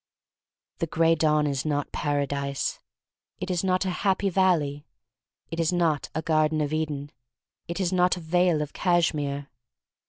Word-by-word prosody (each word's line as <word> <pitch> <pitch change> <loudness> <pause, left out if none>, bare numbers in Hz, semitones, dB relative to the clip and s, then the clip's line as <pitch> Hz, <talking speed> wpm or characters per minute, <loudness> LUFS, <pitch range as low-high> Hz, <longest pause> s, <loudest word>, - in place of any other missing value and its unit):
The 165 - 0
Gray 165 +1 +3
Dawn 155 -2 +2
is 140 -3 -1
not 145 -2 -1
Paradise; 140 -1 -1 0.6
it 185 0 -4
is 180 -1 0
not 185 0 +1
a 185 - 0
Happy 195 0 +1
Valley; 160 -6 +1 0.6
it 165 - -4
is 165 0 +2
not 165 -5 +1
a 160 - -1
Garden 155 -1 +2
of 150 0 -1
Eden; 145 -2 -2 0.6
it 170 +2 -4
is 185 -1 0
not 180 0 +3
a - - -5
Vale 175 -1 +2
of 145 - -9
Cashmere. 150 -5 0
160 Hz, 155 wpm, -26 LUFS, 145-180 Hz, 0.6 s, Gray